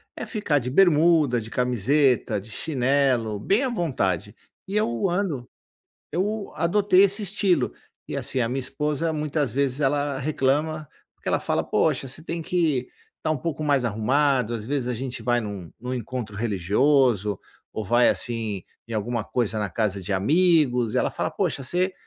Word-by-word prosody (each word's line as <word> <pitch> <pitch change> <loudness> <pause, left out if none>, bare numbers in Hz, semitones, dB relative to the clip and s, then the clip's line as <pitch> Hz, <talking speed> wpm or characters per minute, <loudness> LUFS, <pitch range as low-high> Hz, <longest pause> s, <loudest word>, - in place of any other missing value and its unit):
é - - -5
ficar 185 - 0
de 125 -1 -4
bermuda, 155 -5 +4
de 110 - -9
camiseta, 125 -1 +2
de 110 +3 -13
chinelo, 130 -5 +1
bem 200 - +2
à 265 - 0
vontade, 105 - -1 0.3
e 195 - -4
eu 185 - +1
ando 170 -10 -2 0.6
eu 200 +5 -2
adotei 190 +3 +4
esse 200 +2 +2
estilo. 195 -2 +1 0.3
E - - -4
assim, 130 - -2
a 120 - +2
minha 130 +3 -2
esposa 150 +5 -2
muitas 150 -3 -1
vezes 140 +2 0
ela 145 0 +1
reclama, 150 +2 0 0.3
porque - - -13
ela - - +2
fala: - - 0
"Poxa 135 - +1
você 135 +5 -8
tem 170 0 -4
que 155 -7 0 0.3
tá 155 - 0
um 155 - 0
pouco 155 +2 -4
mais 140 -3 +2
arrumado". 125 +2 +1
Às 110 -2 -4
vezes 135 -1 -1
a 125 - -1
gente 130 +2 -5
vai 120 -1 +1
num 100 -6 -6
num 125 +1 -4
encontro 120 -3 -5
religioso, 105 +1 +2 0.4
ou 110 - -3
vai 120 +5 +4
assim 110 -5 -1 0.2
em 115 - -6
alguma 110 +1 -1
coisa 110 -3 -1
na 105 - -2
casa 100 -1 -1
de 100 +2 -3
amigos, 130 - +3
ela - - +1
fala: - - -2
"Poxa 170 -8 -2
você, 180 +7 0
135 Hz, 170 wpm, -24 LUFS, 115-155 Hz, 0.6 s, bermuda